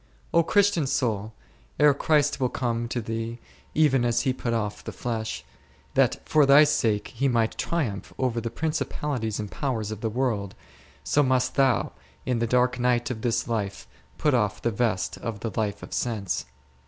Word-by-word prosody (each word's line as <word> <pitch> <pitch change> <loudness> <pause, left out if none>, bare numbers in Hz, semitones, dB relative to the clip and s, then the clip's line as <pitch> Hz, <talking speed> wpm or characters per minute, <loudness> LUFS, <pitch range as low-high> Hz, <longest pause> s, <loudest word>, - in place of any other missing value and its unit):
O 170 - +6
Christian 190 -3 +2
soul, 115 -6 -1 0.5
ere 150 -1 +6
Christ, 150 0 +2
will 130 -2 +1
come 120 -2 -2
to 120 +1 -2
thee, 115 +1 -4 0.4
even 145 -5 +4
as 120 -1 +2
He 130 -2 +1
put 125 -2 -3
off 105 -3 -2
the - - -5
flesh, 110 -12 -4 0.5
that - - +3
for 150 -2 +4
thy 140 +2 +8
sake 115 -8 +1
He 135 +3 -1
might 115 -3 +1
triumph 125 -13 -2
over 120 -3 0
the 115 - -3
principalities 140 -5 -2
and 105 -1 -5
powers 115 -7 -2
of 110 -1 -6
the 115 - 0
world, 110 -5 -1 0.5
so 115 - +2
must 130 -2 +2
thou, 135 -3 +2 0.3
in 125 -2 0
the 115 - 0
dark 125 +1 +2
night 120 0 +1
of 110 -3 -5
this 120 +1 0
life, 105 -4 -3 0.3
put 150 - +2
off 105 -4 +1
the 120 - 0
vest 105 -4 -1
of 110 -3 -5
the 115 - -3
life 105 -2 -2
of - - -8
sense. 105 -7 -2
120 Hz, 180 wpm, -26 LUFS, 110-135 Hz, 0.5 s, thy